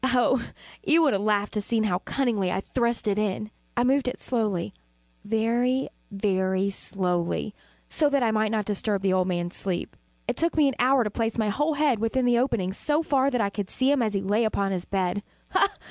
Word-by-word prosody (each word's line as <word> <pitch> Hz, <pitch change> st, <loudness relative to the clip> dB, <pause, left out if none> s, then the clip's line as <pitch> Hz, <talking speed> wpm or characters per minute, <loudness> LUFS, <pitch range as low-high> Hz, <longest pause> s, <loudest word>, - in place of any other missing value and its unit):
Oh, 255 Hz, -1 st, +2 dB, 0.4 s
you 330 Hz, -3 st, +4 dB
would 295 Hz, -, +3 dB
have 200 Hz, -, 0 dB
laughed 205 Hz, -1 st, 0 dB
to 210 Hz, -, -1 dB
see 225 Hz, +3 st, 0 dB
how 180 Hz, -4 st, 0 dB
cunningly 215 Hz, -7 st, -1 dB
I -, -, 0 dB
thrust 235 Hz, +2 st, -1 dB
it 205 Hz, 0 st, +1 dB
in! 210 Hz, +1 st, -2 dB, 0.3 s
I 240 Hz, -, +3 dB
moved 265 Hz, +1 st, +2 dB
it 250 Hz, -, -2 dB
slowly 215 Hz, -8 st, -2 dB, 0.5 s
very, 235 Hz, +4 st, +1 dB, 0.2 s
very 195 Hz, -1 st, 0 dB
slowly, 180 Hz, 0 st, -2 dB, 0.3 s
so 300 Hz, -2 st, +2 dB
that 280 Hz, -3 st, +2 dB
I 225 Hz, -, +2 dB
might 215 Hz, 0 st, +1 dB
not 215 Hz, -1 st, -1 dB
disturb 205 Hz, -1 st, -1 dB
the 190 Hz, -1 st, +2 dB
old 185 Hz, -1 st, +2 dB
man's 175 Hz, -1 st, -2 dB
sleep. 185 Hz, -3 st, -3 dB, 0.3 s
It -, -, -2 dB
took 335 Hz, 0 st, 0 dB
me 300 Hz, -2 st, +5 dB
an 270 Hz, -, 0 dB
hour 255 Hz, 0 st, +4 dB
to 210 Hz, -, -3 dB
place 225 Hz, +1 st, -2 dB
my 215 Hz, -2 st, +1 dB
whole 295 Hz, +8 st, 0 dB
head 285 Hz, -6 st, +2 dB
within 225 Hz, +3 st, 0 dB
the 240 Hz, -1 st, +3 dB
opening 225 Hz, -8 st, 0 dB
so 300 Hz, +9 st, 0 dB
far 275 Hz, -3 st, +2 dB
that 250 Hz, -4 st, 0 dB
I 200 Hz, -1 st, 0 dB
could 200 Hz, -2 st, -4 dB
see 260 Hz, +2 st, +1 dB
him 285 Hz, -3 st, +2 dB
as 215 Hz, -3 st, 0 dB
he 195 Hz, -, 0 dB
lay 205 Hz, +4 st, +1 dB
upon 200 Hz, -3 st, 0 dB
his 180 Hz, -2 st, -2 dB
bed. 190 Hz, 0 st, -1 dB, 0.3 s
Ha! -, -, +3 dB
220 Hz, 215 wpm, -26 LUFS, 195-255 Hz, 0.5 s, me